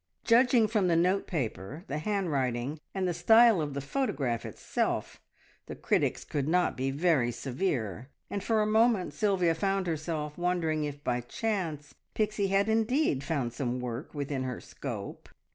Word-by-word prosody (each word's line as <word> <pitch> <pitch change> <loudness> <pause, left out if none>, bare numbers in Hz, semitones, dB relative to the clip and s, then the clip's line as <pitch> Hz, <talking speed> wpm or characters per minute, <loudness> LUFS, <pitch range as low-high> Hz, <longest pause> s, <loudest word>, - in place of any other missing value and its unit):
Judging 240 -1 +5
from 210 -3 +1
the 170 - +3
note 185 +4 +2
paper, 135 - -4
the 145 +2 -3
handwriting, 145 - -1 0.2
and 190 -1 0
the 175 - 0
style 220 +3 +6
of 145 -2 -3
the 140 - -2
photograph 140 - -1
itself, - - -2 0.5
the - - -6
critics - - 0
could 145 -1 -2
not 180 +2 +2
be 130 +1 -1
very 140 -3 +2
severe, 120 - -3 0.2
and 200 - -4
for 220 -2 +2
a - - 0
moment 220 -2 +3
Sylvia 190 -6 +2
found 195 +2 0
herself 155 -2 -3
wondering 165 -4 0
if 145 0 -6
by 125 -1 0
chance 155 - -3 0.2
Pixie 210 -2 0
had 195 +1 +2
indeed 220 - +1
found 140 -6 -2
some 125 -1 -2
work 125 +2 -5
within 140 -2 -2
her 130 -2 -3
scope. 115 -8 -7
160 Hz, 160 wpm, -29 LUFS, 135-200 Hz, 0.5 s, style